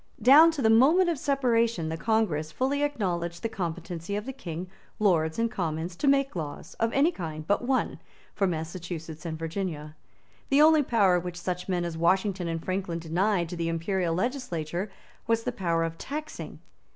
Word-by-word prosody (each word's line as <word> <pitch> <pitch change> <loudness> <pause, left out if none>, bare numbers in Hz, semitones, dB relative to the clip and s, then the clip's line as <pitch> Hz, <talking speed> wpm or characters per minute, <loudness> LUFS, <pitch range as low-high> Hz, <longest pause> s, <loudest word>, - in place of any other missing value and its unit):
Down 280 +8 +8
to 285 -5 -3
the 220 - +5
moment 310 +11 +5
of 325 -5 -1
separation 235 - +1
the 160 - -2
Congress 165 -6 0
fully 270 - 0
acknowledged 175 - -2
the - - +1
competency 180 -2 -4
of 210 +1 -3
the 265 - -5
King, 175 -9 -6 0.3
Lords 165 -6 +2
and 230 0 0
Commons 165 0 -3
to 285 - -1
make 275 -3 +3
laws, 160 0 -6
of 230 0 +1
any 285 +7 +3
kind 155 - -6
but 205 - +1
one, 260 +1 0 0.3
for 195 - +1
Massachusetts 165 -1 -5
and 160 -1 -4
Virginia. 160 -2 -4 0.5
The 275 - +4
only 315 -1 +6
power 200 -9 +3
which 175 0 -6
such 180 +1 -4
men 175 -2 0
as 165 -1 -4
Washington 185 +1 +1
and 165 -1 -4
Franklin 185 -2 -2
denied 175 +3 0
to 175 - -5
the 165 -1 -2
Imperial 165 +1 -1
legislature 185 - -2 0.4
was 230 0 +1
the - - -1
power 170 -3 0
of 165 0 -4
taxing. 305 +2 -6
185 Hz, 175 wpm, -27 LUFS, 165-230 Hz, 0.5 s, Down